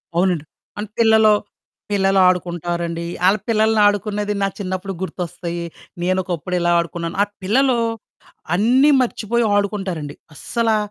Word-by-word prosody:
అవునండి. 175 Hz, -3 st, +1 dB, 0.3 s
అన్ 210 Hz, -, -4 dB
పిల్లలు. 220 Hz, -1 st, +5 dB, 0.6 s
పిల్లలు 195 Hz, -1 st, +2 dB
ఆడుకుంటారండి. 170 Hz, -1 st, -1 dB, 0.2 s
ఆళ్ళ 195 Hz, +3 st, +5 dB
పిల్లలనాడుకునేది 210 Hz, -1 st, +2 dB
నా 195 Hz, -, +2 dB
చిన్నప్పుడు 190 Hz, 0 st, -4 dB
గుర్తొస్తయీ, 175 Hz, -2 st, -4 dB, 0.4 s
నేనొకప్పుడిలా 180 Hz, -1 st, -1 dB
ఆడుకున్నాను. 170 Hz, 0 st, -4 dB
ఆ -, -, 0 dB, 0.2 s
పిల్లలూ 255 Hz, +5 st, +2 dB, 0.8 s
అన్నీ 245 Hz, +9 st, +4 dB
మర్చిపోయి 235 Hz, -1 st, 0 dB
ఆడుకుంటారండి. 190 Hz, -8 st, -2 dB, 0.2 s
అస్సలా 225 Hz, +8 st, 0 dB
195 Hz, 100 wpm, -20 LUFS, 175-215 Hz, 0.8 s, పిల్లలు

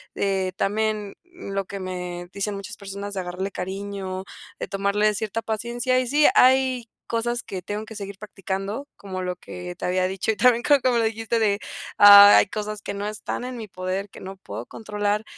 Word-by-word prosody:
de 190 Hz, -2 st, 0 dB
también 210 Hz, 0 st, -1 dB
lo 200 Hz, -, -5 dB
que 200 Hz, +1 st, -7 dB
me 180 Hz, -1 st, -5 dB
dicen 200 Hz, 0 st, -2 dB
muchas 195 Hz, -1 st, -8 dB
personas 200 Hz, 0 st, -7 dB
de 195 Hz, -, -3 dB
agarrarle 180 Hz, +2 st, -4 dB
cariño, 190 Hz, 0 st, -5 dB, 0.3 s
de -, -, -4 dB
tomarle 200 Hz, +2 st, +1 dB
cierta 220 Hz, +2 st, -2 dB
paciencia. 240 Hz, +3 st, 0 dB
Y 255 Hz, -, -1 dB
sí, 295 Hz, +3 st, +5 dB
hay 255 Hz, -2 st, +4 dB, 0.2 s
cosas 235 Hz, +1 st, -1 dB
que 185 Hz, -2 st, -7 dB
tengo 210 Hz, +3 st, -4 dB
que 220 Hz, -, -10 dB
seguir 200 Hz, -1 st, -7 dB
practicando, 200 Hz, +5 st, -4 dB
como 185 Hz, -2 st, -6 dB
lo 180 Hz, 0 st, -2 dB
que 180 Hz, 0 st, -8 dB
te -, -, -12 dB
había 185 Hz, 0 st, +1 dB
dicho 190 Hz, +2 st, -3 dB
y -, -, -3 dB
también 240 Hz, +1 st, +4 dB
creo 290 Hz, -1 st, +5 dB
como 250 Hz, -2 st, +2 dB
lo -, -, +2 dB
dijiste 225 Hz, +1 st, -1 dB
de: 205 Hz, -2 st, +2 dB, 0.4 s
"Hay 205 Hz, 0 st, +10 dB
cosas 210 Hz, 0 st, -5 dB
que 200 Hz, -, -4 dB
no 200 Hz, +1 st, -3 dB
están 215 Hz, +3 st, -4 dB
en 250 Hz, -1 st, -5 dB
mi 220 Hz, -2 st, -6 dB
poder, 185 Hz, +2 st, -4 dB
que -, -, -12 dB
no 190 Hz, 0 st, -8 dB
puedo 110 Hz, -, -7 dB
controlar, 210 Hz, -1 st, -2 dB
205 Hz, 190 wpm, -24 LUFS, 190-225 Hz, 0.4 s, Hay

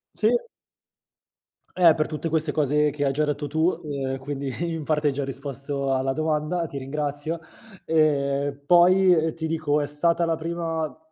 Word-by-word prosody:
Sì. -, -, +2 dB, 1.5 s
Eh, 170 Hz, -3 st, +7 dB
per 155 Hz, -1 st, -1 dB
tutte 155 Hz, +1 st, -4 dB
queste 155 Hz, -1 st, +1 dB
cose 150 Hz, 0 st, +2 dB
che 145 Hz, 0 st, -3 dB
hai 135 Hz, -, +2 dB
già 150 Hz, +3 st, 0 dB
detto 145 Hz, 0 st, -2 dB
tu. 160 Hz, +4 st, +2 dB
Ehm, 135 Hz, -3 st, -3 dB
quindi 140 Hz, +1 st, -5 dB
in 165 Hz, -3 st, -3 dB
parte 150 Hz, -1 st, +1 dB
hai 140 Hz, -, +2 dB
già 140 Hz, 0 st, -2 dB
risposto 140 Hz, 0 st, -3 dB
alla 135 Hz, 0 st, 0 dB
domanda, 155 Hz, +2 st, -1 dB
ti 140 Hz, -, -7 dB
ringrazio; 145 Hz, +3 st, -3 dB, 0.4 s
ehm, 140 Hz, -3 st, +1 dB
poi, 180 Hz, +2 st, +6 dB
ehm, 160 Hz, -1 st, +1 dB
ti 160 Hz, -1 st, -5 dB
dico 155 Hz, -2 st, 0 dB
è -, -, -1 dB
stata 165 Hz, +4 st, +1 dB
la 165 Hz, -1 st, +1 dB
prima 165 Hz, -1 st, -3 dB
150 Hz, 165 wpm, -24 LUFS, 140-160 Hz, 1.5 s, Eh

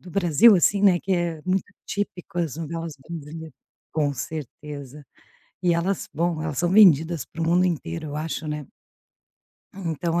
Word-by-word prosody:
do 180 Hz, -, -12 dB
Brasil, 195 Hz, +3 st, +6 dB
assim, 200 Hz, +3 st, +3 dB
né, 185 Hz, -3 st, +6 dB
que 195 Hz, -, -2 dB
é 170 Hz, -3 st, -1 dB
muito 185 Hz, +2 st, -1 dB
típico 180 Hz, -3 st, -4 dB
as 160 Hz, -4 st, -2 dB
novelas 165 Hz, 0 st, -5 dB
brasileiras 160 Hz, -1 st, -7 dB, 0.4 s
com 150 Hz, -3 st, +1 dB
certeza. 145 Hz, 0 st, -7 dB, 0.6 s
E 175 Hz, -1 st, +3 dB
elas, 180 Hz, +3 st, -1 dB
bom, 165 Hz, 0 st, 0 dB
elas 155 Hz, -4 st, -3 dB
são 175 Hz, -, +2 dB
vendidas 170 Hz, -6 st, +5 dB
para 165 Hz, -, -8 dB
o -, -, +1 dB
mundo 175 Hz, +2 st, +3 dB
inteiro, 155 Hz, -, -3 dB
eu 145 Hz, -, -6 dB
acho, 155 Hz, +1 st, -3 dB
né. 150 Hz, -1 st, -4 dB, 1.1 s
Então, 170 Hz, -2 st, -2 dB
165 Hz, 160 wpm, -24 LUFS, 150-180 Hz, 1.1 s, Brasil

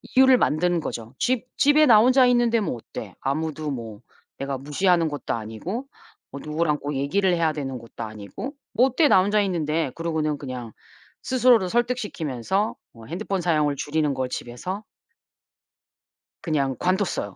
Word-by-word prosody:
이유를 260 Hz, 0 st, +7 dB
만드는 175 Hz, -2 st, +1 dB
거죠. 115 Hz, -3 st, -6 dB
'집 250 Hz, -1 st, 0 dB
집에 290 Hz, +2 st, +5 dB
나 225 Hz, -4 st, +8 dB
혼자 255 Hz, +3 st, +5 dB
있는데 240 Hz, -2 st, +3 dB
뭐 200 Hz, -, -2 dB
어때? 105 Hz, -3 st, -9 dB
아무도 155 Hz, +2 st, -2 dB
뭐 115 Hz, -5 st, -6 dB, 0.4 s
내가 140 Hz, 0 st, -3 dB
무시하는 165 Hz, +4 st, +1 dB
것도 145 Hz, -3 st, -4 dB
아니고 115 Hz, -, -5 dB, 0.5 s
뭐 140 Hz, -, -7 dB
누구랑 150 Hz, -1 st, 0 dB
꼭 145 Hz, 0 st, -4 dB
얘기를 180 Hz, +8 st, +1 dB
해야 165 Hz, -2 st, +1 dB
되는 135 Hz, -4 st, -4 dB
것도 115 Hz, 0 st, -9 dB
아니고 110 Hz, -, -7 dB, 0.2 s
뭐 240 Hz, +4 st, +5 dB
어때 270 Hz, +4 st, +3 dB
나 185 Hz, -, +6 dB
혼자 205 Hz, +2 st, +2 dB
있는데?' 165 Hz, -6 st, -1 dB
그러고는 160 Hz, -3 st, -1 dB
그냥 125 Hz, -4 st, -6 dB, 0.5 s
스스로를 245 Hz, -6 st, +4 dB
설득시키면서 210 Hz, -, -1 dB, 0.2 s
뭐 115 Hz, -1 st, -13 dB
핸드폰 190 Hz, +2 st, -3 dB
사용을 155 Hz, -4 st, +1 dB
줄이는 150 Hz, 0 st, 0 dB
걸 130 Hz, -1 st, -2 dB
집에서 180 Hz, -, -5 dB, 1.6 s
그냥 140 Hz, -5 st, 0 dB
관뒀어요. 185 Hz, -, -1 dB
160 Hz, 335 characters per minute, -24 LUFS, 135-210 Hz, 1.6 s, 나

